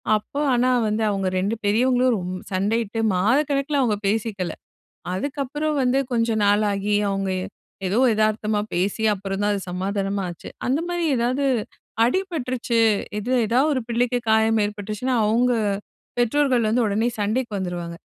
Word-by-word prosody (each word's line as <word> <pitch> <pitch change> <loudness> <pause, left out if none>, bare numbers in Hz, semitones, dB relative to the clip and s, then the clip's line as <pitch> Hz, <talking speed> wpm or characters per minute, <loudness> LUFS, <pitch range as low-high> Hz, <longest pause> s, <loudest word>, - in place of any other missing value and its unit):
அப்போ 215 +7 -4
ஆனா 250 +1 +3 0.2
வந்து 215 +1 0
அவுங்க 195 -2 -1
ரெண்டு 200 +4 0
பெரியவங்களும் 250 +3 +3
ரொம் 180 -1 -4 0.2
சண்டையிட்டு 220 +3 0 0.2
மாதக்கணக்குல 275 - +1
அவங்க 220 -5 +1
பேசிக்கல. 200 -5 -1 0.6
அதுக்கப்பறம் 285 +6 -2
வந்து, 255 +2 +2
கொஞ்சம் 230 -2 +1
நாள் 205 +1 +3
ஆகி 200 +1 0 0.2
அவுங்க 195 0 -1
ஏ - - -4 0.4
ஏதோ 195 +4 0 0.2
எதார்த்தமா 215 0 +1 0.2
பேசி, 190 +5 -1
அப்பறம் 195 0 -4
தான் 205 - +2
அது 200 - -1
சமாதானமா 195 +2 -2
ஆச்சு. 175 - -9 0.2
அந்த 265 +4 +1
மாரி 350 -1 -2
ஏதாவது 250 +4 0 0.6
அடிபட்டுருச்சு, 255 -7 -1 0.4
இது 230 +5 -4 0.2
எதாவது 260 +7 +3
ஒரு 260 - -1
பிள்ளைக்கு 245 +1 +1
காயம் 220 0 +3
ஏற்பட்டுருச்சுன்னா, 210 +5 -3
அவுங்க 240 +4 +3 0.7
பெற்றோர்கள் 245 -1 +2
வந்து 235 +2 +2
உடனே 215 +3 +1
சண்டைக்கு 220 +4 -1
வந்துருவாங்க. 175 -2 -4
220 Hz, 140 wpm, -23 LUFS, 200-255 Hz, 0.7 s, ஆனா